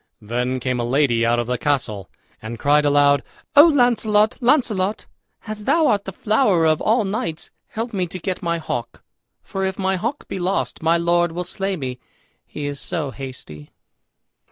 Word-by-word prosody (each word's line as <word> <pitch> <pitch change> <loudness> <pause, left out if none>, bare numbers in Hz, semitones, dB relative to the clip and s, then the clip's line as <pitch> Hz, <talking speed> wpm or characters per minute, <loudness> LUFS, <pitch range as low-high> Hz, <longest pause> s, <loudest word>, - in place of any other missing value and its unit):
Then 125 +4 -2
came 125 0 -2
a - - 0
lady 120 -2 +2
out 120 +1 +2
of 120 - 0
the 125 0 -2
castle 120 -10 -1 0.3
and 110 +2 -6
cried 145 +4 +3
aloud, 145 -1 +4 0.3
"O 290 +2 +10
Launcelot, 225 -7 +3
Launcelot, 225 -7 +1 0.4
as 215 -1 -6
thou 325 -1 +3
art 205 -7 +2
the 195 - -5
flower 205 -4 +2
of 155 -1 +2
all 225 +2 +2
knights, 195 -5 -4 0.2
help 230 +2 -5
me 185 -3 -1
to 180 - -7
get 185 +1 -4
my 170 -1 -1
hawk; 120 -7 -5 0.4
for 195 - -4
if 190 0 -2
my 190 -1 0
hawk 235 +10 -4
be - - -5
lost, 185 +3 -1
my 165 +1 +3
lord 170 0 +1
will 180 +1 -3
slay 195 +2 -3
me, 130 -6 -5 0.5
he 150 - -6
is 145 -1 -4
so 150 -3 -3
hasty." 105 - -9
170 Hz, 180 wpm, -21 LUFS, 135-205 Hz, 0.5 s, O